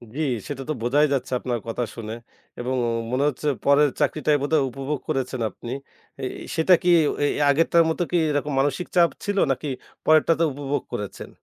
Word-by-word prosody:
জি, 155 - -2 0.3
সেটা 135 -2 -5
তো - - +1
বোঝাই 140 +6 +3
যাচ্ছে 130 -2 -2
আপনার 120 -2 -2
কথা 115 +2 -2
শুনে। 110 -2 -6 0.5
এবং 125 +2 -2 0.4
মনে 130 +2 +1
হচ্ছে 150 +2 -5 0.2
পরের 145 +1 +5
চাকরিটাই 150 0 +2
বোধহয় 145 +1 +2
উপভোগ 135 +3 -4
করেছেন 130 -4 -2
আপনি। 115 +4 -9 0.5
এই - - -1
এই - - -8
সেটা 160 +3 +5
কি 180 - +2 0.3
এ - - +4
এ - - +3 0.2
আগেরটার 165 +3 +4
মতো 160 +2 0
কি 175 - +3
এরকম 145 0 -1
মানসিক 145 +5 0
চাপ 170 -1 +6 0.2
ছিল, 205 0 -1
নাকি 145 +3 -2 0.4
পরেরটাতে 155 +1 +4
উপভোগ 145 +1 -2
করেছেন? 105 -1 -5
145 Hz, 180 wpm, -24 LUFS, 130-155 Hz, 0.5 s, চাপ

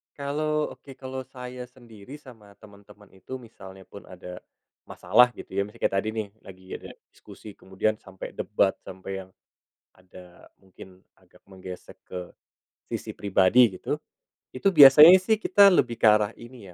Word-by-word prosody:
Kalau 150 +2 -2
oke. 135 -2 -14
Kalau 130 0 -8
saya 125 -1 -9
sendiri, 120 0 -15
sama 115 -8 -16
teman-teman 105 -1 -18
itu, 95 +7 -10
misalnya 95 -5 -14
pun 100 - -14
ada, 90 0 -11 0.5
masalah, 125 0 +3
gitu - - -12
ya. 100 - -1
Misalnya 105 - -18
kayak - - 0
tadi, 110 +2 -4
nih, 110 -2 -3
lagi 95 -2 -15
ada - - -8 0.2
diskusi, 105 - -14
kemudian 100 +3 -3
sampai 95 -1 -11
debat, 100 -2 0 0.2
sampai 95 +1 -8
yang, 95 - -25 0.7
ada 90 -1 -17
mungkin 95 0 -16 0.2
agak - - -26
menggesek 95 -1 -11
ke, 90 -1 -9 0.6
sisi - - -6
pribadi, 100 +2 +3
gitu. - - -3 0.5
Itu 190 +9 -1
biasanya 150 +3 +9
sih, 220 +3 +1
kita 200 -1 +5
lebih 120 -9 +1
ke - - +3
arah 105 0 +1
ini, 120 -2 -14
105 Hz, 150 wpm, -25 LUFS, 95-130 Hz, 0.7 s, biasanya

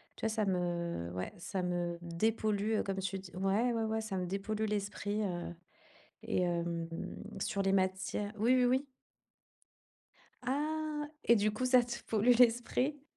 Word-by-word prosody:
Tu - - -15
vois? - - +3
Ça 220 -1 0
me 175 - -1
ouais, 90 +1 -3
ça 185 +2 -3
me 175 -1 -1
dépollue, 210 +4 0
heu, - - +1
comme 195 -1 -3
tu 195 0 -2
dis 185 -1 -11
ouais, 200 +6 +2
ouais, 220 -1 0
ça 215 -3 -3
me 180 - -1
dépollue 200 +4 -2
l'esprit, 205 0 -2
heu 175 -3 -3 0.7
et - - 0
hem, 170 -1 -1 0.5
sur 200 +1 -1
les 195 - +2
matières 190 +2 0
oui, 235 +5 +4
oui, 250 -1 +4
oui. 260 +3 +2 1.6
Ah 300 +3 -1 0.2
et 235 - +6
du 210 +1 +2
coup, 235 +4 -2
ça 255 -1 +6
te 235 0 -4
pollue 225 +3 +4
l'esprit? 250 +4 +3
205 Hz, 160 wpm, -33 LUFS, 180-235 Hz, 1.6 s, et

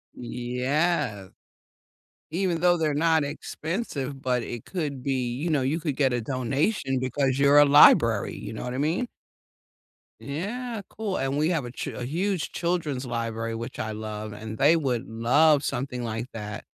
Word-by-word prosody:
Yeah. 125 - -1 1.0
Even 175 -1 0
though 175 0 +4
they're 155 -2 +1
not 160 +1 +3
expensive, 145 - -4
but 125 -2 +1
it 120 -1 -6
could 145 -8 -4
be 130 -3 -1
you 160 +6 -2
know, 150 -3 +2
you 140 +6 0
could 150 -4 -2
get 135 -3 +2
a 120 - 0
donation 135 - 0
because 130 +1 0
you're 140 +1 +6
a 145 - +8
library, 115 -7 +6
you - - -7
know - - -6
what 125 0 -4
I - - -3
mean? 165 - 0 1.1
Yeah, 215 - -4
cool, 210 -3 -3
and 135 +1 -1
we 155 +3 +2
have 160 -7 0
a 120 - -7
ch - - -5
a 120 - -5
huge 175 +3 -1
children's 155 -7 -1
library, 115 -1 -3
which 115 +3 -6
I 110 - -2
love 110 0 -5
and 110 +1 -7
they 150 +4 +5
would 130 -7 -1
love 140 +7 +3
something 125 -1 -3
like 115 +1 -3
that. 105 -2 -6
135 Hz, 170 wpm, -26 LUFS, 120-160 Hz, 1.1 s, a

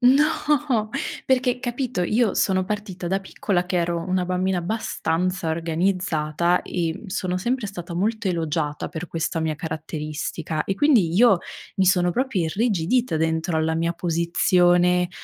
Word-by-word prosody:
no, 270 -3 +3 0.3
perché, 250 -1 +1
capito, 245 -5 -2
io 220 +4 +2
sono 190 -1 +2
partita 195 -3 -4
da 195 +1 0
piccola 190 -1 -1
che 180 0 -2
ero 170 0 0
una 185 -1 0
bambina 185 0 0
abbastanza 180 -3 -1
organizzata 170 0 0
e 165 -3 -2
m - - -8
sono 185 -2 -2
sempre 240 +2 -1
stata 175 -3 -7
molto 215 +2 0
elogiata 160 -3 -2
per 170 +2 -6
questa 165 0 -2
mia 160 -1 -1
caratteristica 155 0 -4
e 195 - -1
quindi 215 - +3
io 220 -2 +6 0.4
mi 190 - +3
sono 180 -1 +4
proprio 235 -5 0
irrigidita 205 +2 +1
dentro 160 +1 0
alla 160 0 +1
mia 170 +1 0
posizione 175 +1 +3
180 Hz, 140 wpm, -23 LUFS, 165-210 Hz, 0.4 s, io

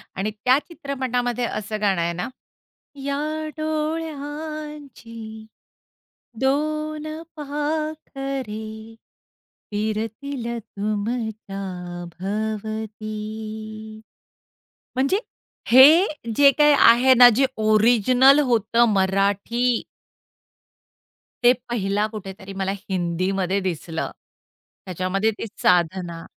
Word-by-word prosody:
आणि 205 +3 -2
त्या 250 +5 +3
चित्रपटामध्ये 250 -5 -2
असं 215 +1 -5
गाणं 195 -4 +2
आहे 170 0 0
ना 180 - -3 0.8
या 280 0 -1 0.4
डोळ्यांची 300 -7 -5 0.9
दोन 305 +3 -1 0.3
पाखरे 285 -6 -4 1.1
फिरतील 225 +5 -3
तुमच्या 215 -1 -4 0.6
भवती. 215 +1 -4 1.8
म्हणजे 275 +10 +2 0.5
हे 260 +4 +10 0.5
जे 280 -1 +7
काही 295 0 +6 0.2
आहे 255 +3 +6
ना 245 - +11
जे 270 - +4 0.2
ओरिजिनल 245 +5 +5
होतं 230 +1 +3
मराठी 200 +5 +1 1.8
ते 240 - +8 0.2
पहिला 205 -2 0
कुठेतरी 195 -1 -8
मला 195 0 -2 0.2
हिंदीमध्ये 185 +2 0
दिसलं. 170 -3 -3 0.7
त्याच्यामध्ये 185 +4 0
ती - - -4 0.2
साधना. 175 -1 +1
220 Hz, 75 wpm, -23 LUFS, 200-275 Hz, 1.8 s, ना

